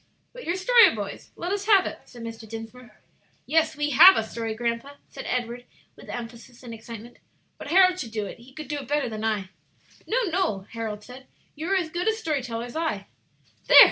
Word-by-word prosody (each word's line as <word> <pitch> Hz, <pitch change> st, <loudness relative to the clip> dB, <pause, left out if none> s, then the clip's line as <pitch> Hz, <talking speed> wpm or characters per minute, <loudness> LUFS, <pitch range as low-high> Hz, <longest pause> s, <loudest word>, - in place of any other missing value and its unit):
"But -, -, -10 dB
your 345 Hz, -, 0 dB
story, 465 Hz, -, +6 dB
boys; 205 Hz, -2 st, -6 dB
let 350 Hz, +2 st, -4 dB
us 405 Hz, 0 st, -2 dB
have 395 Hz, -4 st, +6 dB
it," -, -, -5 dB
said 240 Hz, -2 st, -12 dB
Mr. 225 Hz, -1 st, -8 dB
Dinsmore. 225 Hz, +2 st, -10 dB, 0.4 s
"Yes, 320 Hz, 0 st, +2 dB
we 295 Hz, 0 st, -1 dB
have 350 Hz, +8 st, +9 dB
a -, -, +1 dB
story, 225 Hz, 0 st, -4 dB
grandpa," 235 Hz, +4 st, -3 dB
said -, -, -9 dB
Edward, 245 Hz, 0 st, -3 dB, 0.3 s
with -, -, -14 dB
emphasis 240 Hz, +1 st, -8 dB
and 235 Hz, -2 st, -8 dB
excitement; 230 Hz, +1 st, -10 dB, 0.4 s
"but -, -, -8 dB
Harold 370 Hz, 0 st, +5 dB
should 235 Hz, -8 st, -5 dB
tell 215 Hz, -2 st, -2 dB
it; 200 Hz, -, -9 dB
he 245 Hz, +3 st, -16 dB
could 305 Hz, +1 st, -8 dB
do 295 Hz, +1 st, -3 dB
it 270 Hz, -, -9 dB
better 290 Hz, -1 st, 0 dB
than 220 Hz, -2 st, -5 dB
I." 210 Hz, -4 st, -1 dB, 0.6 s
"No, 460 Hz, -, 0 dB
no," 345 Hz, -, 0 dB
Harold 220 Hz, -2 st, -5 dB
said; 255 Hz, +3 st, -12 dB, 0.3 s
"you 310 Hz, +3 st, -6 dB
are 390 Hz, -, +3 dB
as 345 Hz, -4 st, 0 dB
good 350 Hz, +4 st, -2 dB
a 440 Hz, -, +4 dB
story 320 Hz, -11 st, -2 dB
teller 235 Hz, -1 st, -4 dB
as 245 Hz, -, -10 dB
I." 320 Hz, 0 st, -2 dB, 0.6 s
"There!" -, -, +7 dB
250 Hz, 210 wpm, -25 LUFS, 230-330 Hz, 0.6 s, have